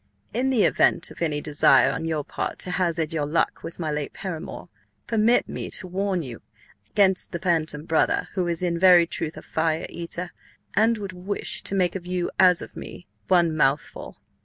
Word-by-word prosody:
"In 260 Hz, +2 st, +1 dB
the 245 Hz, -6 st, +3 dB
event -, -, +3 dB
of -, -, -13 dB
any 150 Hz, -3 st, 0 dB
Desire 145 Hz, -2 st, +4 dB
on 160 Hz, +3 st, -4 dB
Yr 155 Hz, -2 st, -1 dB
Part -, -, -4 dB
to 180 Hz, -, -3 dB
hazard 170 Hz, -3 st, 0 dB
Yr 155 Hz, -2 st, -1 dB
Luck 155 Hz, +3 st, 0 dB
with 165 Hz, -, -8 dB
my 160 Hz, -3 st, -3 dB
late 150 Hz, -1 st, -3 dB
Paramour, 175 Hz, -5 st, -6 dB, 0.4 s
Permit 225 Hz, +1 st, +2 dB
Me -, -, -5 dB
to -, -, -3 dB
warn 185 Hz, -1 st, -1 dB
You 120 Hz, -4 st, -8 dB, 0.5 s
'gainst 190 Hz, -2 st, +3 dB
the -, -, -1 dB
Bantam 160 Hz, -4 st, -1 dB
Brother, 160 Hz, -1 st, +1 dB
who 185 Hz, -3 st, -1 dB
is 170 Hz, +1 st, -2 dB
in 170 Hz, -1 st, 0 dB
Very 180 Hz, -2 st, +7 dB
Truth 160 Hz, -1 st, -3 dB
a -, -, -9 dB
Fire 160 Hz, 0 st, -1 dB
Eater, 170 Hz, +1 st, -5 dB, 0.4 s
and 225 Hz, +3 st, +3 dB
would 200 Hz, -3 st, -6 dB
wish 185 Hz, +3 st, -4 dB
to 200 Hz, -, -3 dB
make 180 Hz, -3 st, +2 dB
of 180 Hz, -2 st, -6 dB
You, 180 Hz, -1 st, -2 dB
as 180 Hz, -2 st, +6 dB
of -, -, -12 dB
Me, 175 Hz, -, -9 dB, 0.2 s
one 175 Hz, -3 st, +4 dB
Mouthfull. 145 Hz, -1 st, -1 dB
175 Hz, 190 wpm, -24 LUFS, 160-185 Hz, 0.5 s, Very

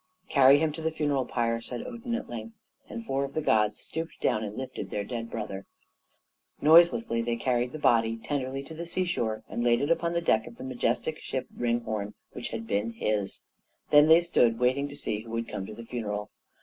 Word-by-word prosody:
"Carry 140 Hz, 0 st, +7 dB
him 155 Hz, +1 st, +1 dB
to 160 Hz, -, -7 dB
the 160 Hz, -, +1 dB
funeral 145 Hz, -4 st, 0 dB
pyre!" 115 Hz, -1 st, 0 dB
said 120 Hz, +1 st, -6 dB
Odin, 235 Hz, -1 st, -4 dB
at 240 Hz, -, -4 dB
length; 230 Hz, -1 st, -7 dB, 0.3 s
and 230 Hz, -2 st, -6 dB
four 135 Hz, -5 st, 0 dB
of 140 Hz, -, -6 dB
the -, -, +1 dB
gods 105 Hz, -6 st, +2 dB
stooped 165 Hz, +1 st, -5 dB
down 110 Hz, -, +1 dB
and 105 Hz, 0 st, -6 dB
lifted 130 Hz, 0 st, -5 dB
their 105 Hz, -, -2 dB
dead 115 Hz, +1 st, -5 dB
brother. 100 Hz, -4 st, -5 dB, 0.9 s
Noiselessly 170 Hz, -, +5 dB
they 120 Hz, 0 st, -1 dB
carried 125 Hz, +1 st, 0 dB
the 155 Hz, -, -6 dB
body 115 Hz, -5 st, +3 dB
tenderly 135 Hz, +2 st, -3 dB
to 160 Hz, -, -10 dB
the 170 Hz, +2 st, -6 dB
seashore 165 Hz, -12 st, -1 dB
and 120 Hz, -, -3 dB
laid 120 Hz, -1 st, +4 dB
it 145 Hz, +3 st, 0 dB
upon 170 Hz, 0 st, +1 dB
the 170 Hz, -, +2 dB
deck 110 Hz, -9 st, +2 dB
of 120 Hz, -, -11 dB
the -, -, -8 dB
majestic 130 Hz, +4 st, -1 dB
ship, 130 Hz, -1 st, -3 dB
Ringhorn, 115 Hz, -4 st, -2 dB, 0.2 s
which -, -, -5 dB
had 115 Hz, 0 st, -5 dB
been 110 Hz, +2 st, -1 dB
his. 105 Hz, -3 st, -2 dB, 0.5 s
Then 145 Hz, +1 st, +8 dB
they 160 Hz, +2 st, +8 dB
stood 120 Hz, -9 st, +3 dB
waiting 130 Hz, +4 st, +2 dB
to 145 Hz, -, -9 dB
see 105 Hz, -6 st, -3 dB
who 115 Hz, +1 st, -11 dB
would 115 Hz, 0 st, -2 dB
come 95 Hz, -, -5 dB
to 110 Hz, -, -8 dB
the 115 Hz, -, -9 dB
funeral. 105 Hz, -3 st, -4 dB
125 Hz, 210 wpm, -28 LUFS, 115-155 Hz, 0.9 s, Then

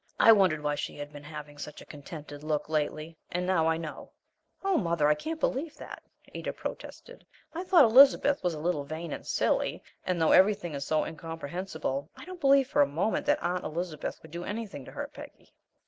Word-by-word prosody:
I 225 Hz, -, +8 dB
wondered 185 Hz, -8 st, +4 dB
why 150 Hz, 0 st, +1 dB
she 145 Hz, -, -4 dB
had 145 Hz, 0 st, -7 dB
been 145 Hz, 0 st, -10 dB
having 150 Hz, -1 st, -9 dB
such 150 Hz, 0 st, -7 dB
a -, -, -12 dB
contented 145 Hz, 0 st, -9 dB
look 155 Hz, -1 st, -1 dB
lately 155 Hz, +1 st, -2 dB
and 180 Hz, +1 st, -1 dB
now 175 Hz, -3 st, +2 dB
I 160 Hz, 0 st, +2 dB
know." 160 Hz, -2 st, -8 dB, 0.5 s
"Oh, 390 Hz, -1 st, +2 dB
mother, 170 Hz, -, +2 dB
I 150 Hz, -, +6 dB
can't 315 Hz, -, -5 dB
believe 300 Hz, +1 st, -1 dB
that!" -, -, -9 dB, 0.3 s
Ada -, -, -4 dB
protested. -, -, -8 dB, 0.3 s
"I 345 Hz, +3 st, -4 dB
thought 365 Hz, -4 st, +6 dB
Elizabeth 275 Hz, +3 st, +6 dB
was 175 Hz, -2 st, 0 dB
a -, -, -6 dB
little 155 Hz, -2 st, -1 dB
vain 155 Hz, +2 st, -5 dB
and -, -, -8 dB
silly, -, -, 0 dB, 0.2 s
and, 180 Hz, -2 st, -1 dB
though 160 Hz, -, +3 dB
everything 190 Hz, -3 st, +4 dB
is 140 Hz, -1 st, -4 dB
so 155 Hz, -1 st, +2 dB
incomprehensible, 165 Hz, -2 st, -5 dB
I -, -, -10 dB
don't 365 Hz, -1 st, -9 dB
believe 275 Hz, -2 st, +5 dB
for -, -, +2 dB
a 145 Hz, -, +5 dB
moment 165 Hz, +10 st, -1 dB
that -, -, +2 dB
Aunt 180 Hz, +1 st, -1 dB
Elizabeth 165 Hz, -1 st, -4 dB
would 160 Hz, -, -13 dB
do 170 Hz, +1 st, -5 dB
anything 205 Hz, -, -5 dB
to -, -, -10 dB
hurt -, -, -6 dB
Peggy." -, -, -13 dB
165 Hz, 205 wpm, -29 LUFS, 150-205 Hz, 0.5 s, I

